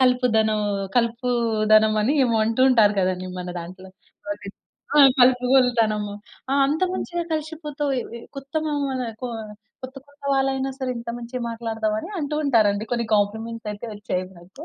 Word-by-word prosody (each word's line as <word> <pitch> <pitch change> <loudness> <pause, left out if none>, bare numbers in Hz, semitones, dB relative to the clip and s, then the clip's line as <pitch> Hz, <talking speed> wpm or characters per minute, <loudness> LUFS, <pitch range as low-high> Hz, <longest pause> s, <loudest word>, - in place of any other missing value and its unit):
కలుపుదనం 225 -4 +3 0.4
కలుపూదనమని 225 -1 +2
ఏమో 230 -2 +1
అంటూ 225 +3 -1
ఉంటారు 215 -4 +5
కదండీ 185 0 -1
మన 180 0 -5
దాంట్లో. 185 +2 -10 0.4
అది 200 -1 -9 0.5
ఆ! - - +6 0.2
కలుపుగోలుతనము. 245 -5 +3 0.4
ఆ! 275 - +2
అంత 305 +5 -1
మంచిగా 345 -2 -3
కలిషిపోతావు. 300 -2 -3
ఏ - - -3 0.2
ఏ - - -11 0.2
కొత్త 275 +3 -10
మామాలే 275 -4 -2
కొ 250 - -2 0.5
కొత్త 260 +1 -8
కొత్త 285 0 -25
వాళ్ళైనా 270 0 0
సరే 260 -2 -2
ఇంత 235 - -9
మంచిగ 240 +2 -6
మాట్లాడతావని 225 +1 -2
అంటూ 300 -1 -3
ఉంటారండి. 215 -6 +3
కొన్ని 235 -1 0
కాంప్లిమెంట్సయితే 220 +1 -2
వొచ్చాయి 185 -3 -3
నాకు. 190 - -13
235 Hz, 135 wpm, -23 LUFS, 215-270 Hz, 0.5 s, ఆ